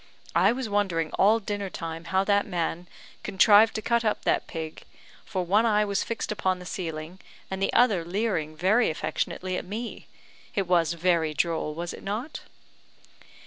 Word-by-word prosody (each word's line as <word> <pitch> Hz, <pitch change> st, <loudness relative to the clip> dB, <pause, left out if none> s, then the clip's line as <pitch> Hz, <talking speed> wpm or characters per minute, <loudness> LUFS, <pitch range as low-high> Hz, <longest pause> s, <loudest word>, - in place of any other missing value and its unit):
I 185 Hz, +5 st, +5 dB
was 250 Hz, 0 st, -3 dB
wondering 190 Hz, -6 st, 0 dB
all 215 Hz, +3 st, +4 dB
dinner 205 Hz, -2 st, -4 dB
time 165 Hz, -1 st, -6 dB
how 190 Hz, +2 st, +1 dB
that 200 Hz, 0 st, +2 dB
man 175 Hz, 0 st, -2 dB, 0.3 s
contrived 210 Hz, +3 st, +5 dB
to 215 Hz, -, -3 dB
cut 235 Hz, -1 st, +2 dB
up 215 Hz, -, 0 dB
that -, -, +1 dB
pig; 160 Hz, -2 st, -6 dB, 0.4 s
for 185 Hz, -3 st, -2 dB
one 205 Hz, +6 st, +3 dB
eye 210 Hz, -2 st, +3 dB
was 200 Hz, 0 st, 0 dB
fixed 230 Hz, -2 st, -4 dB
upon 185 Hz, -3 st, 0 dB
the 180 Hz, -, -11 dB
ceiling, 165 Hz, 0 st, -5 dB, 0.3 s
and 190 Hz, 0 st, -3 dB
the 195 Hz, -, +1 dB
other 210 Hz, -8 st, +4 dB
leering 175 Hz, -4 st, -2 dB
very 215 Hz, +8 st, +3 dB
affectionately 185 Hz, +3 st, -2 dB
at -, -, -4 dB
me. 220 Hz, +6 st, -6 dB, 0.5 s
It 195 Hz, -, +1 dB
was 170 Hz, -2 st, +2 dB
very 170 Hz, -2 st, +1 dB
droll; 160 Hz, -1 st, -1 dB
was 170 Hz, +1 st, -4 dB
it -, -, -10 dB
not?" 225 Hz, +10 st, -4 dB
190 Hz, 170 wpm, -26 LUFS, 170-210 Hz, 0.5 s, I